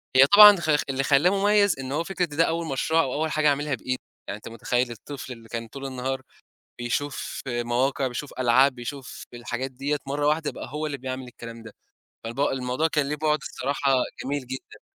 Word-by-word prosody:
هي 130 - +9
طبعًا 210 +2 +10
خ 155 -3 +2
خ 150 - +1
اللي 135 +1 0
خلّاه 145 +5 +4
مميّز 200 -4 +3
إن 130 0 -5
هو 150 +4 0
فكرة 180 -1 -1
ده 160 0 +1
أول 165 0 -1
مشروع 160 +4 +2
أو 130 - -3
أول 155 +1 -1
حاجة 155 0 +2
أعملها 145 0 0
بإيدي، 130 +2 -4 0.3
يعني 100 - -4
أنت - - -12
متخيّل 120 +2 -1
الطفل 130 +2 -8
اللي 115 -1 -15
كان 115 -1 -4
طول 135 +4 -8
النهار، 130 0 -3 0.6
بيشوف 135 +4 -3
مواقع 125 +2 0
بيشوف 130 +4 -6
ألعاب 130 +2 +4
بيشوف 130 +2 -7
الحاجات 120 +2 -4
ديّة 140 +3 -2
مَرّة 145 +1 0
واحدة 155 0 +1
بقى - - -8
هو 150 +2 -3
اللي 145 -2 -3
بيعمل 130 0 -5
الكلام 115 -1 -10
ده، 115 -2 -11 0.5
فالب 115 +4 -6
الموضوع 135 +2 +1
كان 150 -3 0
ليه 150 - -1
بُعد 150 0 +1
الصراحة 140 +1 -1 0.3
جميل 140 -1 -3
جدًا. 130 +1 -8
135 Hz, 195 wpm, -25 LUFS, 125-150 Hz, 0.6 s, طبعًا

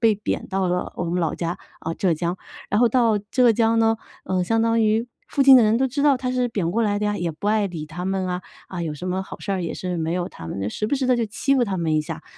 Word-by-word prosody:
被 225 -2 +4
贬 210 - -3
到 190 -1 0
了 180 0 -2
我 175 - -2
们 175 +1 -1
老 160 -3 0
家， 170 0 -3 0.2
啊， 165 - -3
浙 175 -2 +1
江。 170 +3 -2 0.3
然 205 +3 +1
后 240 - +5
到 230 -3 +3
浙 250 -3 +5
江 225 0 +2
呢， 225 0 +3 0.3
呃， 185 -1 0
相 225 +4 +1
当 230 0 +2
于 220 +2 +2 0.2
附 275 - +1
近 270 -1 +9
的 245 - +6
人 215 +1 +3
都 265 +2 +2
知 275 +3 -2
道 285 -3 +5
他 250 0 -3
是 250 -1 +1
贬 185 -7 -1
过 230 +5 +1
来 205 -2 +1
的 210 - -1
呀， 205 0 0
也 175 -1 -1
不 160 +7 -7
爱 210 -1 +2
理 165 -5 -6
他 175 +4 -6
们 190 0 -1
啊， 180 0 -3 0.3
啊， 175 -2 -5
有 155 -2 -3
什 180 +5 -7
么 190 +1 -1
好 - - -9
事 200 - -3
儿 185 -2 -1
也 170 - -3
是 180 -1 -3
没 160 0 -1
有 180 -1 -2
他 80 - -10
们 - - -5
的， 100 - -1
时 215 - -2
不 285 - 0
时 265 -1 -1
地 250 -1 +3
就 230 - 0
欺 275 +6 0
负 255 - +3
他 195 -3 -2
们 165 -3 0
一 - - +3
下。 150 - -6
205 Hz, 325 characters per minute, -23 LUFS, 175-230 Hz, 0.3 s, 近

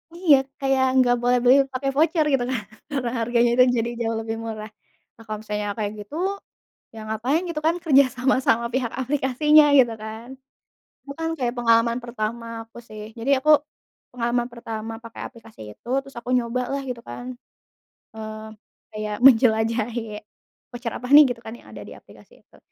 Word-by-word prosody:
Iya, 340 -5 +5 0.2
kayak 270 -1 +1
enggak 250 -2 +4
boleh 245 +1 +3
beli 250 +2 +6 0.2
pakai 270 +1 -1
voucer 315 +1 +2
gitu 270 -3 +2
kan, 255 - -1 0.3
karena 260 -4 -2
harganya 235 +1 +2
kan 250 - +7
jadi 230 +1 -1
jauh 225 -1 -1
lebih 225 0 -4
murah. 215 -1 -6 0.5
Nah, 225 - -15
kalau 215 -1 -5
misalnya 210 -1 -4
kayak 205 -1 -2
gitu, 245 +9 -12 0.8
ya - - -8
ngapain 245 +10 0
gitu 305 -3 -4
kan 335 - +2
kerja 280 -4 +6
sama, 260 +2 +2
sama 235 +1 +3
pihak 250 -3 -1
aplikasinya 290 +3 +4
gitu 240 -3 +4
kan. 220 +2 -8 0.8
Bukan 325 +4 -4
kayak 245 -2 -1
pengalaman 230 0 +3
pertama 230 0 -5
aku 230 +1 -15
sih, 215 0 -9
jadi 265 +3 +1
aku 305 - +4 0.7
pengalaman 240 0 -1
pertama 225 -1 -6
pakai 230 - -8
aplikasi 225 -3 -17 0.2
itu, - - -17
terus 275 -1 -16
aku 240 - -7
nyoba 245 +1 -1
lah 275 0 -2
gitu 245 -2 -5
kan, 250 +1 -8 0.8
eee, 215 0 -8 0.5
kayak 215 0 -4
menjelajahi 225 -2 +2 0.5
"Voucher 240 -1 -5
apa 250 - -6
nih," 295 +1 +9
gitu 230 - -19
kan 220 - -7
yang - - -18
ada - - -9
di - - -11
aplikasi - - -19
itu. - - -23
240 Hz, 170 wpm, -23 LUFS, 225-265 Hz, 0.8 s, nih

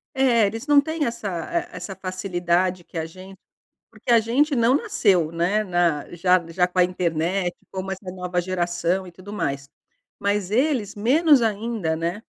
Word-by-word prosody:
É, 240 -5 +4
eles 225 +5 -5
não 290 -1 +6
têm 315 0 -2
essa 230 -3 -4 0.4
essa 195 - -7
facilidade 185 -1 -1
que 170 - -10
a 160 - -1
gente, 185 +3 -12 0.5
porque - - -4
a 235 - +7
gente 270 +6 +1
não 235 +2 +4
nasceu, 180 - +2
né, 180 +6 +1 0.5
já 180 0 +3
já 180 +1 +2
com 180 0 -2
a - - +7
internet, 175 +1 -1 0.2
como 190 0 -4
essa 190 -1 -6
nova 180 -1 -2
geração 175 0 -1
e 175 - -11
tudo 190 +4 -12
mais. 140 -7 -3 0.5
Mas 200 -1 -1
eles 250 -5 +1
menos 280 +6 +4
ainda, 215 -6 -1
né? 170 +6 -3
190 Hz, 160 wpm, -23 LUFS, 175-225 Hz, 0.5 s, a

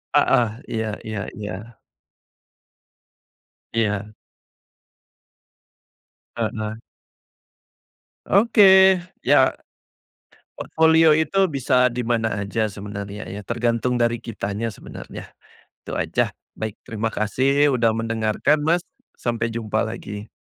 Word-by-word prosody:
Heeh, 120 -3 +4 0.2
iya 110 -1 -1 0.2
iya 110 -1 -4 0.2
iya. 105 +2 -7 2.0
Iya. 105 -2 -1 2.2
Heeh. 110 -1 -3 1.5
Oke, 190 -3 +6 0.2
ya. - - +4 1.0
Portofolio 160 0 +4
itu 190 +4 +2
bisa 130 -2 +2
di 120 0 -4
mana 115 -2 0
aja 110 +1 -1
sebenarnya 100 +1 -7
ya, 100 - -7
tergantung 120 +2 -1
dari 120 -1 0
kitanya 110 0 -4
sebenarnya. 105 - -10 0.6
Itu - - -8
aja, - - 0 0.2
baik, 110 -2 -5
terima 110 0 -2
kasih 135 +7 +2
udah 115 -2 +3
mendengarkan, 115 +6 0
Mas, 170 +3 +2 0.4
sampai 115 -1 -2
jumpa 115 -2 -1
lagi. 105 -2 -7
115 Hz, 90 wpm, -22 LUFS, 110-135 Hz, 2.2 s, Oke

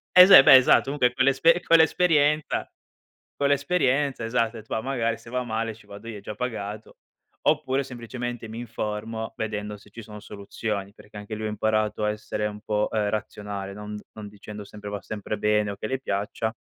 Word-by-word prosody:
eh, 180 - +11
se 165 -8 +10
beh, - - +9
esatto, 130 -1 +6
comunque 135 -3 +1
co 130 +1 +1
l'esperie 160 +6 +4
co 165 - +4
l'esperienza 155 -3 +2 0.7
co 140 - +1
l'esperienza, 140 -3 +1
esatto 115 0 0
e - - -7
ho - - -13
det: 110 - -29
"Va 110 - -1
magari 115 -4 -1
se - - -15
va 125 +1 -1
male, 115 -1 -3
ci 110 - -19
vado 100 +3 -11
io, 110 -3 -6
è - - -10
già 105 - -7
pagato." 110 -3 -5 0.5
Oppure, 140 -3 +2
semplicemente 120 -2 -6
mi 110 - -7
informo, 110 -1 -5
vedendo 105 -1 -4
se 105 0 -19
ci 115 - -10
sono 105 -1 -10
soluzioni, 100 -1 -5
perché 105 -1 -16
anche 105 +1 -6
lui 110 0 -4
ha - - -2
imparato 110 0 0
a 105 - +2
essere 105 0 -3
un 105 0 -6
po', 105 0 -1
ehm, 105 -2 0
razionale 100 -2 -5
non 105 0 -7
non 105 -1 -9
dicendo 105 0 -10
sempre, 105 0 -9
va 100 -2 -5
sempre 105 0 -5
bene 105 -1 +1
o 100 - -8
che - - -5
le 130 0 -1
piaccia, 110 0 -3
110 Hz, 205 wpm, -25 LUFS, 105-130 Hz, 0.7 s, eh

